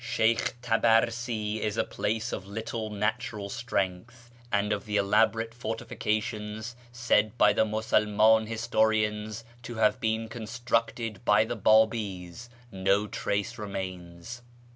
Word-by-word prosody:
Sheykh 115 +1 +1
Tabarsi 115 -1 +1
is 105 0 -2
a - - +3
place 110 +2 -2
of 95 - -5
little 110 +1 -4
natural 105 0 -2
strength; 115 +1 -3 0.2
and 105 0 +1
of 100 - -4
the 105 -1 -1
elaborate 115 +3 +2
fortifications, 110 -1 -3 0.2
said 120 -2 +1
by - - +5
the 110 - +3
Musulman 110 0 +3
historians 110 -1 0 0.2
to 120 0 -7
have 110 +2 +2
been 110 -1 0
constructed 115 -1 -2
by 105 -1 +4
the 120 +2 -3
Babi's, 110 -2 +1 0.2
no 95 +1 +1
trace 105 +3 -2
remains. 95 +1 -6
110 Hz, 120 wpm, -28 LUFS, 105-115 Hz, 0.2 s, by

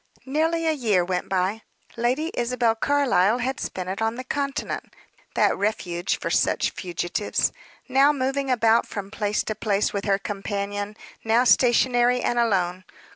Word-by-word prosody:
Nearly 320 +4 0
a 320 - +3
year 215 - +1
went 180 0 -2
by. 190 +3 0 0.3
Lady 255 +8 0
Isabel 240 -1 +1
Carlyle 240 -5 +2
had 260 +2 -2
spent 185 -1 -4
it 190 +3 -4
on 225 +1 0
the 255 - -6
continent 280 +2 -3 0.4
that - - +3
refuge 185 -4 -1
for - - -4
such - - +1
fugitives 175 +2 -2 0.4
now 270 +2 +5
moving 270 0 -1
about 230 -2 +3
from 200 -1 -6
place 210 -1 -1
to 215 - -3
place 210 -1 0
with 200 -1 -3
her 200 -2 +2
companion, 205 +1 -4 0.3
now 225 +2 +3
stationary 245 0 +4
and 240 - 0
alone. 185 -5 +1
225 Hz, 150 wpm, -24 LUFS, 200-255 Hz, 0.4 s, now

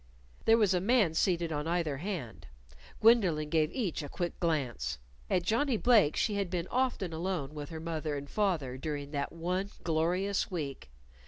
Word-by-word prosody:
There 225 0 +6
was 210 -4 +3
a 180 - +1
man 210 -5 +3
seated 170 -1 +1
on 150 0 -2
either 165 -4 0
hand. 130 - -5 0.5
Gwendolyn 185 -10 +4
gave 155 -1 +2
each 200 - -2
a 145 - -6
quick 175 +3 -4
glance. 125 - -1 0.3
At 180 - +2
Johnnie 235 +6 +1
Blake's 215 -10 +4
she 215 - +1
had 200 -3 -1
been 175 -1 -2
often 245 -9 0
alone 160 -4 -2
with 145 -1 -6
her 160 - -6
father 155 -2 -3
and 140 0 -6
mother 165 -12 0
during 145 0 -4
that 140 -2 -2
one 180 +4 -2
glorious 175 +5 0
week. 140 - -5
170 Hz, 170 wpm, -31 LUFS, 150-195 Hz, 0.5 s, There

